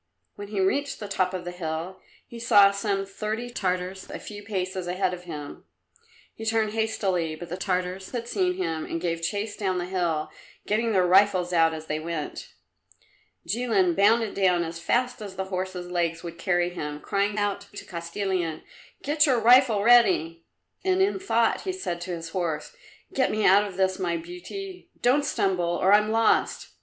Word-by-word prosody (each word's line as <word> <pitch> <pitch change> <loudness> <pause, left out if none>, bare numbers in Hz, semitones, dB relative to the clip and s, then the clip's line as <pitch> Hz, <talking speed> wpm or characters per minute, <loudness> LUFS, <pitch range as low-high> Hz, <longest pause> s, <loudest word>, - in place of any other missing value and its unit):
When 205 - -8
he 205 -1 -3
reached 280 +10 0
the 210 - -6
top 185 -2 0
of 185 -1 -5
the 175 - -4
hill 170 +1 -5 0.3
he 235 - -10
saw 205 -3 +6
some 200 -1 -1
thirty 215 +4 -4
Tartars 185 -3 -3
a - - -5
few 205 -1 -9
paces 185 -3 -3
ahead 185 +1 0
of 180 0 -8
him. 150 -4 -8 0.7
He 225 - -9
turned 220 -1 +1
hastily, 195 -7 -1
but 170 +2 -9
the 175 - -3
Tartars 185 0 -2
had 235 -2 -4
seen 365 +5 0
him 160 - -2
and 165 - -3
gave 165 -1 -2
chase 205 +5 -2
down 190 -3 -1
the 175 - -2
hill, 175 -4 -1 0.3
getting 225 +2 +1
their 185 -3 +3
rifles 185 -1 +4
out 165 -1 +4
as 160 -1 -6
they 155 0 -2
went. 160 -2 -5 1.0
Jilin 210 -6 +2
bounded 220 +2 +3
down 180 -3 +2
as 165 0 -6
fast 245 +7 0
as 200 -3 -7
the 190 +1 -3
horse's 185 -1 -4
legs 170 -1 -1
would 170 -1 -8
carry 175 -1 +1
him, 150 -4 -5
crying 200 +4 -1
out 205 -1 -1
to - - -8
Kostilin, 170 -1 -3 0.4
"Get 300 +1 +3
your 255 -4 +3
rifle 235 -2 +5
ready!" 185 -8 +4 0.4
And 375 -1 +2
in 390 0 0
thought 235 - +1
he 380 - -2
said 270 - -4
to 180 +1 -5
his 165 0 -7
horse, 170 - -3 0.4
"Get 265 - +2
me 215 0 0
out 200 +2 +6
of 190 -3 -8
this, 190 0 +1
my 170 -2 0
beauty; 350 - -8
don't 265 +4 +3
stumble, 180 -9 0
or 190 +2 +4
I'm 210 +1 +5
lost. 225 0 +2
190 Hz, 180 wpm, -26 LUFS, 175-220 Hz, 1.0 s, saw